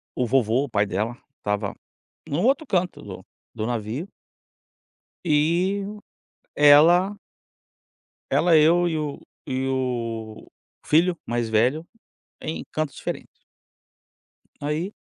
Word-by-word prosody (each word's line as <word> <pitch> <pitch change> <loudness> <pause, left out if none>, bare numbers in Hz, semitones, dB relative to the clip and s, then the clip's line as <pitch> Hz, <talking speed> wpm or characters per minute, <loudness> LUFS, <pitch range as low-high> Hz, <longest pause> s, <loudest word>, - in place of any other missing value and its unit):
o 125 - 0
vovô, 130 +1 +2
o - - -10
pai 105 -3 +2
dela, 105 +5 -2 0.2
estava 105 -1 -2 0.5
em - - -5
um 175 - 0
outro 275 +5 +2
canto 180 -2 -1
do - - -9 0.3
do 110 -1 -3
navio 120 - -3 1.2
e 175 +6 +2 0.7
ela 170 +7 +6 1.1
-ela 170 -2 +4
eu 170 +3 +5
e 160 - -1
o 150 -2 -4 0.3
e 130 0 -2
o 115 -4 -3 0.4
filho 170 +3 +3
mais 120 -1 -1
velho, 125 +9 +1 0.5
em 155 - -5
cantos 155 -2 -2
diferentes. - - -5 1.3
Aí 155 +7 -2
145 Hz, 110 wpm, -24 LUFS, 115-170 Hz, 1.3 s, ela